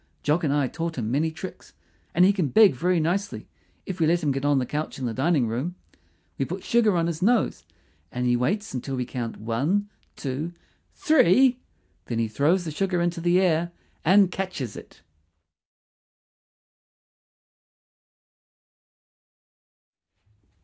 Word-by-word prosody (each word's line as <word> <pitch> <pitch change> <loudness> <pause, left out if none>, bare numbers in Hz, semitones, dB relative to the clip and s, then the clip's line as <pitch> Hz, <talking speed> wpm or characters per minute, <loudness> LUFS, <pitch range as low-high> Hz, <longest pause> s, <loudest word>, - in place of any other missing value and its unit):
Jock 155 +4 +1
and 145 - +1
I 145 -2 +1
taught 165 +2 -4
him 115 -2 -2
many 150 +5 +1
tricks; 160 - -9 0.4
and 175 +2 +6
he 200 - +5
can 185 -6 0
beg 205 - +6
very 175 +7 +1
nicely, 195 +6 -2 0.4
if 185 -1 -6
we 160 - +3
let 170 +1 +2
him 145 - +2
get 135 0 -3
on 145 -1 +3
the 130 - 0
couch 150 +4 -4
in 130 - -4
the 115 - -2
dining 140 +1 +1
room. 130 +11 -3 0.6
We - - +1
put - - -6
sugar 220 -6 +2
on 165 - +1
his 165 -2 -3
nose, 230 +4 +1 0.5
and 125 0 -3
he 120 0 +3
waits 195 - -1
until 135 +1 -4
we 125 -1 -2
count 120 -2 -5
One, 145 - -1 0.2
Two, 145 +5 -4 0.4
THREE. 260 - +4 0.5
Then 115 - -3
he 115 -1 +1
throws 155 - +1
the 160 - -4
sugar 185 +3 -1
into 170 0 -1
the 175 +2 +3
air 175 -2 +1 0.3
and 190 +2 +5
catches 180 - -4
it. - - -13
165 Hz, 150 wpm, -25 LUFS, 135-185 Hz, 0.6 s, and